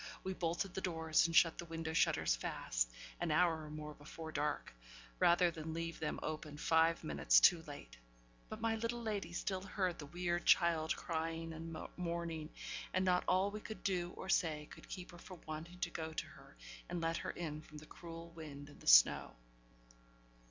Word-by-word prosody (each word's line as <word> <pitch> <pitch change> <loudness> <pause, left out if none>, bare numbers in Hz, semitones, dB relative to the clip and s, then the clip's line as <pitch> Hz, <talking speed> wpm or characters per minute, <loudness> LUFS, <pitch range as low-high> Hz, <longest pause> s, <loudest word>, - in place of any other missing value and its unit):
We 190 - -2
bolted 175 +1 -1
the 190 - -3
doors, 160 -3 +2
and 165 - -3
shut 165 -1 +6
the 175 - -4
window 165 -1 -4
shutters 110 - +3
fast, - - -1 0.3
an - - -1
hour 160 0 +3
or - - -9
more 150 0 -6
before 160 +2 -8
dark, 150 - -2 0.5
rather 175 0 +5
than 160 0 -5
leave 165 0 -3
them 155 - -2
open 155 -1 -4
five 165 +2 +3
minutes 155 - +5
too 175 -3 +6
late. - - -9 0.5
But 215 0 -6
my 225 0 +2
little 230 +1 -2
lady 210 -5 -2
still 185 +2 -2
heard 185 -2 -1
the 145 - -7
weird 175 +2 -1
child 165 -2 +4
crying 165 0 -3
and 165 0 -6 0.2
mourning; 170 -3 -3 0.5
and 185 0 +2
not 180 -1 +3
all 190 +2 +3
we 210 - -5
could 220 - -8
do 180 -3 0
or - - -6
say 155 -5 +1
could - - -12
keep 180 0 -7
her 175 - -12
from 185 0 -11
wanting 155 +3 -6
to 175 - -1
go 160 -1 -4
to - - -2
her, - - -15 0.3
and 175 0 -2
let 165 0 0
her - - -4
in 155 -3 -4
from 155 -1 -12
the 150 - -10
cruel 165 +1 -9
wind 145 -3 -9
and 145 - -15
the - - -13
snow. - - +7
165 Hz, 190 wpm, -37 LUFS, 155-180 Hz, 0.5 s, snow